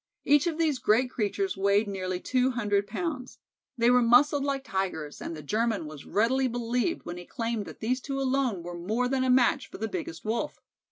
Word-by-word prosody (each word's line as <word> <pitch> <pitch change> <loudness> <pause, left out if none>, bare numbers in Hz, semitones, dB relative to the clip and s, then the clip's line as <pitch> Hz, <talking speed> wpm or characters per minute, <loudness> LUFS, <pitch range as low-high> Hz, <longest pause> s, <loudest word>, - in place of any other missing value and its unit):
Each 290 +3 +4
of 325 -2 -1
these 310 -5 +1
great 245 +4 +2
creatures 250 - -1
weighed 200 +2 +2
nearly 185 -2 -3
two 255 +5 +1
hundred 205 -5 0
pounds. 260 - -4 0.4
They 235 +1 +4
were 250 0 +5
muscled 275 +5 +5
like 275 -1 -1
Tigers, 180 - -3
and 165 - -5
the 155 - -9
German 215 +2 0
was 150 -2 -10
readily 255 +5 +2
believed 245 +6 -1
when 175 0 -5
he 175 - -9
claimed 230 -4 -3
that - - -11
these 255 +4 0
two 275 0 -3
alone 260 -8 0
were 175 +1 -6
more 215 +9 -1
than 260 0 0
a 260 - +1
match 255 +1 +3
for - - -9
the 220 - -2
biggest 330 +2 -6
Wolf. 235 +7 -2
235 Hz, 205 wpm, -28 LUFS, 200-265 Hz, 0.4 s, were